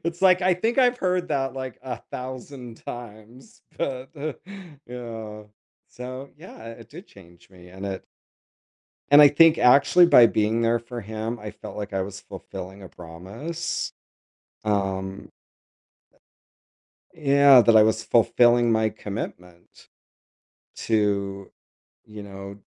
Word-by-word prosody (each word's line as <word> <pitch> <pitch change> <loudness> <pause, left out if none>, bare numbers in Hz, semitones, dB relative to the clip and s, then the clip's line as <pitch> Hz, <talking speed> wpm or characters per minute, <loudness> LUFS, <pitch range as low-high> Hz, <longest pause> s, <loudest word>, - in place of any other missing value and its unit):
it's, 170 +2 -4
like, 185 -1 +5
I 185 -1 +3
think 225 +8 -2
I've 250 -1 +3
heard 180 -1 -1
that, 135 -3 -2
like, 130 -2 -7
a 130 - -5
thousand 125 -1 -8
times, 120 +1 -11 0.2
but, 130 -1 -4 0.8
yeah 115 -3 -8 0.4
so 130 +2 -9
yeah, 155 -8 -13
it 115 -1 -13
did 175 +7 -12
change 85 -3 -19
me, 90 -1 -16
and 95 +2 -8
it 95 -1 -6 1.1
And 145 +1 +8
I 145 - +9
think, 160 +2 +5
actually, 145 +7 +5
by 120 -8 +7
being 110 +1 0
there 115 +1 +2
for 120 +1 -8
him, 110 +2 -5
I 105 -1 -7
felt - - -11
like 105 -1 -6
I 95 - -1
was 100 +1 -8
fulfilling 95 0 -10
a 95 - -10
promise, 100 - -6 0.7
um 95 -2 -3 1.9
uh - - -18
yeah, 140 -3 +6
that 115 -1 +4
I 110 - +7
was 110 0 0
fulfilling 120 +1 +3
my 110 0 +2
commitment 90 -5 -9 0.9
to, 100 -3 -1 0.5
you 105 -1 -11
know 100 0 -10
115 Hz, 130 wpm, -24 LUFS, 100-135 Hz, 1.9 s, I